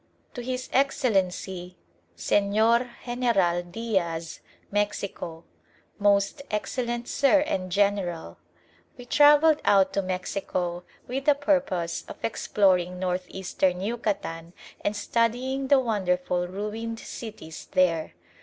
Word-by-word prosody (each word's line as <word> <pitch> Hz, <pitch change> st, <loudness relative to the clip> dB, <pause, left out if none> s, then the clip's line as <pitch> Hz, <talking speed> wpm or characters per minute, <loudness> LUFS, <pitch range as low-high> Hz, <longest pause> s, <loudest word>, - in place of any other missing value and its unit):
To 245 Hz, -, -5 dB
His 255 Hz, +1 st, -4 dB
Excellency 190 Hz, -9 st, 0 dB, 0.4 s
Señor 220 Hz, -, +2 dB, 0.2 s
General 235 Hz, -9 st, +1 dB
Diaz, 175 Hz, -4 st, -3 dB, 0.3 s
Mexico 200 Hz, -5 st, -2 dB, 0.6 s
MOST 200 Hz, +7 st, +2 dB
EXCELLENT 240 Hz, +2 st, -2 dB
SIR 285 Hz, +1 st, +4 dB
AND 190 Hz, -, -2 dB
GENERAL, 185 Hz, -, 0 dB, 0.6 s
We 245 Hz, -, -10 dB
travelled 295 Hz, +3 st, +5 dB
out 195 Hz, -1 st, +4 dB
to 200 Hz, -, +1 dB
Mexico 180 Hz, -1 st, -3 dB, 0.2 s
with 270 Hz, +2 st, -3 dB
the 295 Hz, -, +5 dB
purpose 270 Hz, -, 0 dB
of -, -, -9 dB
exploring 180 Hz, -5 st, +1 dB
North 180 Hz, 0 st, -1 dB
Eastern 185 Hz, -1 st, -1 dB
Yucatan 195 Hz, -6 st, -3 dB, 0.3 s
and 205 Hz, -, 0 dB
studying 245 Hz, +5 st, 0 dB
the 280 Hz, 0 st, +6 dB
wonderful 180 Hz, -6 st, 0 dB
ruined 210 Hz, +4 st, -4 dB
cities 210 Hz, -12 st, -8 dB
there. 170 Hz, -, +2 dB
200 Hz, 105 wpm, -26 LUFS, 180-240 Hz, 0.6 s, the